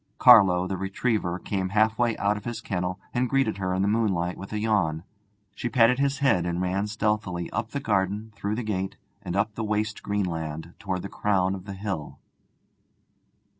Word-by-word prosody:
Carlo, 95 -7 +7
the 95 0 -3
retriever, 95 -2 -1
came 95 0 -2
halfway 110 +3 +2
out 100 +1 +1
of 105 - -7
his 120 -2 -4
kennel 90 -3 -3
and 125 0 +1
greeted 135 -7 +1
her 95 -1 -1
in 95 +1 +1
the - - +2
moonlight 95 -5 +1
with 100 - -9
a 105 - -2
yawn. 100 -8 +1 0.5
She 120 - -3
patted 120 +2 +4
his 140 0 +1
head 130 -11 +3
and 85 0 -2
ran 95 +3 0
stealthily 105 -5 -1
up 110 - -2
the 140 - -3
garden, 105 -1 -1
through 100 +1 -2
the 120 - -3
gate, 95 -3 -3 0.2
and 90 -2 -4
up 105 +2 +1
the 115 - -4
waste 105 0 -1
green 100 -1 -1
land 80 -1 -5
towards 95 -2 -3
the - - -4
crown 95 -2 +1
of 95 -1 -7
the 100 -2 -6
hill. 95 -6 -4
100 Hz, 190 wpm, -26 LUFS, 90-110 Hz, 0.5 s, Carlo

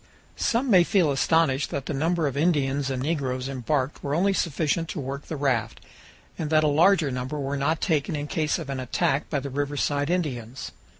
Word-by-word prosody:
Some 240 +2 +1
may 180 -3 +7
feel 170 -4 +2
astonished 145 0 +2
that 140 -1 -4
the - - -3
number 165 +3 0
of 140 -2 -1
Indians 145 -3 +1
and 130 -1 -2
negroes 135 -4 -2
embarked 135 +1 -2
were 140 +1 -1
only 195 +4 +2
sufficient 165 -1 0
to 170 - -4
work 140 +1 -5
the 160 - -4
raft, 125 -6 -1 0.6
and 155 - -2
that 155 0 +4
a - - +3
larger 160 0 +4
number 125 +4 -4
were 140 0 -2
not 150 +3 0
taken 155 -3 0
in 145 0 -3
case 150 0 0
of 140 - -6
an 135 - -3
attack 130 +3 0
by 145 - 0
the 140 0 -6
riverside 145 +1 -1
Indians. 130 -9 -3
145 Hz, 195 wpm, -25 LUFS, 135-160 Hz, 0.6 s, may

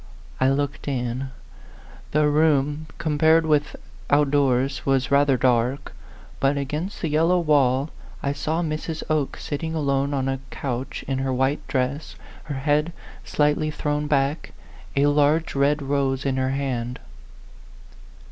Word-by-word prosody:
" - - -22
I - - +5
looked 140 +1 -2
in. 130 0 -2 0.8
The 150 0 +2
room, 150 0 +2
compared 160 0 +3
with 150 -1 +1 0.3
out 145 -1 +3
doors, 135 -1 +1
was 135 -1 +1
rather 140 -1 +4
dark; 125 +1 +1 0.5
but 135 +1 +2
against 150 +7 -4
the - - +1
yellow 165 +4 +3
wall 145 -3 +2 0.3
I 140 - 0
saw 155 +4 -1
Mrs. 155 0 -3
Oke 150 -3 0
sitting 160 +2 -4
alone 140 -2 0
on 135 -1 -1
a 135 0 -1
couch 130 -1 -4
in 135 -1 -1
her 135 0 -1
white 130 +3 0
dress, 135 +3 -2 0.3
her 150 -3 -4
head 150 +4 +1 0.3
slightly 150 +1 +1
thrown 150 0 -2
back, 140 +1 0 0.4
a 140 +1 +3
large 145 +2 +2
red 140 +1 +2
rose 135 -1 0
in 135 -1 0
her 130 0 +1
hand. 125 -3 -2
140 Hz, 140 wpm, -24 LUFS, 135-150 Hz, 0.8 s, I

